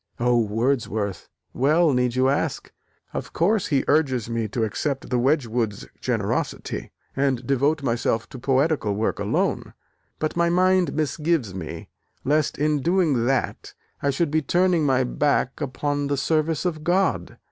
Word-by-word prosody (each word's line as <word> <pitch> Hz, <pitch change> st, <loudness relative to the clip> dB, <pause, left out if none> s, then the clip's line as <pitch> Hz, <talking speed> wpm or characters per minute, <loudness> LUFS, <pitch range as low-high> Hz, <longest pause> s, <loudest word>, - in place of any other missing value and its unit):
"Oh, 120 Hz, 0 st, +3 dB
Wordsworth, 110 Hz, -3 st, -1 dB, 0.2 s
well, 150 Hz, +4 st, +3 dB
need 125 Hz, -1 st, +1 dB
you 130 Hz, +1 st, +3 dB
ask? 140 Hz, +2 st, -1 dB, 0.4 s
Of -, -, -5 dB
course 195 Hz, +4 st, +2 dB
he 140 Hz, -3 st, +1 dB
urges 130 Hz, -7 st, +1 dB
me 115 Hz, -1 st, -1 dB
to 115 Hz, +2 st, -2 dB
accept 135 Hz, +5 st, -2 dB
the 125 Hz, -, +2 dB
Wedgwoods' 120 Hz, -6 st, 0 dB
generosity, -, -, -2 dB, 0.3 s
and 135 Hz, -3 st, 0 dB
devote 140 Hz, +3 st, +1 dB
myself 115 Hz, -2 st, 0 dB
to 130 Hz, -, -9 dB
poetical 135 Hz, -4 st, +1 dB
work 110 Hz, +2 st, -1 dB
alone. -, -, -1 dB, 0.4 s
But 155 Hz, -, -2 dB
my 170 Hz, 0 st, +2 dB
mind 185 Hz, 0 st, +3 dB
misgives 155 Hz, -, 0 dB
me, 90 Hz, -4 st, -7 dB, 0.3 s
lest 150 Hz, +1 st, +1 dB
in 150 Hz, 0 st, +1 dB
doing 160 Hz, -8 st, +2 dB
that 135 Hz, -1 st, -1 dB, 0.3 s
I 140 Hz, -, +1 dB
should 145 Hz, +3 st, 0 dB
be 155 Hz, 0 st, +2 dB
turning 175 Hz, +1 st, +2 dB
my 130 Hz, -1 st, +3 dB
back 135 Hz, +2 st, 0 dB
upon 145 Hz, +1 st, -2 dB
the 140 Hz, 0 st, -1 dB
service 155 Hz, +3 st, 0 dB
of 155 Hz, -4 st, -2 dB
God. 175 Hz, -, 0 dB
140 Hz, 145 wpm, -24 LUFS, 120-155 Hz, 0.4 s, Oh